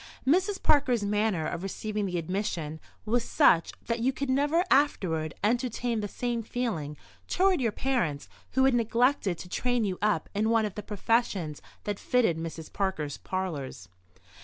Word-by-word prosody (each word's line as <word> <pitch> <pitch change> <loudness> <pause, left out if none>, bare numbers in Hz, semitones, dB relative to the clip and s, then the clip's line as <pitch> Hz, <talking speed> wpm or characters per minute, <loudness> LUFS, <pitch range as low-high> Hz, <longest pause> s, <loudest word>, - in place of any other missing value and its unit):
Mrs. 375 +8 +2
Parker's 255 -7 +3
manner 205 -5 +1
of 170 +2 -3
receiving 210 +2 -3
the 180 -1 -2
admission 165 -3 -3 0.3
was 235 +2 +1
such 185 - +4
that 230 0 -1
you 250 +3 +2
could 275 0 -2
never 295 +6 +3
afterward 170 - +2
entertain 240 +1 0
the 205 - -2
same 240 +2 -2
feeling 195 -12 -3 0.3
toward 375 -4 +3
your 230 -3 +1
parents, 210 - -1 0.3
who 265 0 +4
had 270 - +4
neglected 235 -4 +2
to 180 - -9
train 245 +5 0
you 190 -3 -2
up 205 -6 +1
in 215 +2 +1
one 225 -1 +3
of 210 - -4
the 210 - -5
professions 205 -6 0 0.2
that 205 -1 -3
fitted 230 -10 +2
Mrs. 165 -1 -7
Parker's 160 -8 -2
parlours. 150 - -4
215 Hz, 160 wpm, -28 LUFS, 175-245 Hz, 0.3 s, such